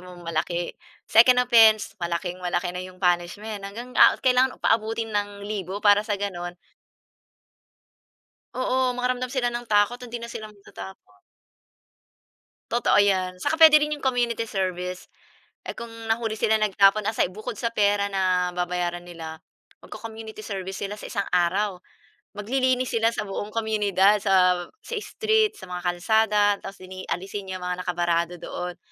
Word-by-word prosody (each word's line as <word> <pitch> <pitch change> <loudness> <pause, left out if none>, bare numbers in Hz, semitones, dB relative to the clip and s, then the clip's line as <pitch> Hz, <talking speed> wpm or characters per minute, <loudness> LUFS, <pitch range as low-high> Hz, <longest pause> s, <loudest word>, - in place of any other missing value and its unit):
mo 180 0 -12
malaki, 170 +1 -2 0.4
second 250 +2 +6
offense, 225 -3 +5
malaking 175 +1 -3
malaki 180 0 -2
na 180 - -6
'yong 185 +1 -15
punishment, 195 +4 -1
hanggang, 235 +5 -8
ah, - - +8
kailangan 255 0 +3
paabutin 225 0 0
ng 205 -1 -3
libo, 200 -1 -5
para 205 0 +5
sa 210 - 0
gano'n 180 -3 -4 2.0
Oo, 255 0 +1
makaramdam 250 0 -1
sila 245 -2 0
ng 240 -1 -6
takot, 210 +4 +2
hindi 240 -1 -6
na 235 - -7
sila 215 -1 -7
magtatapon. 105 - -13 1.5
Totoo 240 -3 +3
'yan, 185 -2 0
saka 320 - 0
puwede 310 -2 +8
rin 300 0 -1
'yong 275 - -10
community 240 -3 0
service. 185 -3 -4 0.6
Eh, - - -5
kung 230 -1 -8 0.2
nahuli 225 -1 0
sila 220 0 +2
nagtapon, 205 0 +3
aside 215 -4 +1
bukod 215 +6 -6
sa 230 +2 -2
pera 205 -2 +1
na 185 -2 +1
babayaran 175 0 -2
nila 165 -2 -8 0.5
mag-co-community 220 0 -9
service 195 -2 -6
sila 205 +1 -4
sa - - -11
isang 200 - -3
araw, 185 +3 +1 0.6
maglilinis 255 +3 0
sila 225 0 +2
sa 230 - -3
buong 205 +1 -5
komunidad 210 -2 +2
sa 180 -3 +3 0.2
sa 480 - -6
street, 435 -1 +1
sa - - -11
mga 180 -1 -6
kalsada, 210 +4 +2 0.2
tapos 195 -1 -10
lini 185 0 -9
aalisin 195 +2 -4
niya 185 - -4
mga 180 0 -3
nakabarado 175 -1 -1
doon, 180 +1 -6
205 Hz, 145 wpm, -24 LUFS, 180-230 Hz, 2.0 s, ah